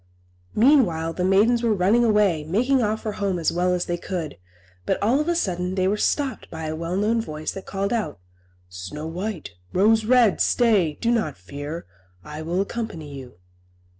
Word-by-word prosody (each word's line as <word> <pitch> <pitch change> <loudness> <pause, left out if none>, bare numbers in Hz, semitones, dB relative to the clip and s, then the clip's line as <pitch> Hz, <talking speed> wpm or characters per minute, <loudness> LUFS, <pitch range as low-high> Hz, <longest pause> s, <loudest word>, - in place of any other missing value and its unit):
Meanwhile, 210 - +3
the 180 - -2
maidens 210 +6 +4
were 230 -3 +2
running 205 +6 +3
away, 210 -8 +3
making 245 - +1
off 215 0 -1
for 215 - -2
home 200 -3 -1
as 165 - +1
well 180 +1 +1
as 180 -1 0
they 175 - -2
could; 170 - -5 0.4
but - - 0
all 235 +7 +2
of 300 - -1
a 345 - +1
sudden 180 - -1
they 185 -1 +1
were 200 - +2
stopped 270 +5 -1
by 160 -1 -6
a 155 0 -3
well 170 +3 -3
known 220 +3 +1
voice 155 -6 -5
that 195 - -9
called 200 +2 -2
out, 225 - -2 0.5
"Snow 90 +12 -7
White, 180 - -5 0.2
Rose 220 +4 +4
Red, 240 -3 +4
stay! 200 -11 +2
Do 235 - +1
not 215 - 0
fear. 145 - -7 0.4
I 150 +1 -7
will 170 +4 -1
accompany 195 -9 -5
you." 130 -3 -10
190 Hz, 185 wpm, -23 LUFS, 160-225 Hz, 0.5 s, maidens